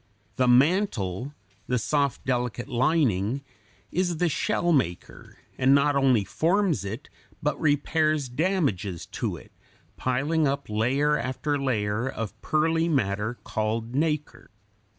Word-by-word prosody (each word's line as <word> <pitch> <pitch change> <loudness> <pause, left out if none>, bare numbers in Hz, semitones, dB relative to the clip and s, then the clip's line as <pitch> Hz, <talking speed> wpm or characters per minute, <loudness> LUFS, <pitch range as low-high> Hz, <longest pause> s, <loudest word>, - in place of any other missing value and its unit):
The 130 - +3
mantle, 130 - +2 0.3
the 125 - +1
soft, 140 +3 0
delicate 125 -2 -1
lining, 130 - +1 0.5
is 175 -2 0
the 175 +1 +2
shell 175 +3 0
maker, 90 - -2 0.2
and 135 +2 +5
not 140 +1 +3
only 130 -6 +3
forms 175 - +1
it, 110 +8 -6 0.4
but 150 -1 -1
repairs 155 -1 +1
damages 125 - -1
to - - -4
it, - - -15 0.5
piling 145 +5 +1
up 140 0 -2
layer 135 +8 +2
after 135 +3 -2
layer 115 -2 0
of 115 -5 -5
pearly 160 +2 +1
matter 105 -4 0
called 110 +2 -2
nacre. 150 +1 -2
135 Hz, 120 wpm, -26 LUFS, 115-155 Hz, 0.5 s, and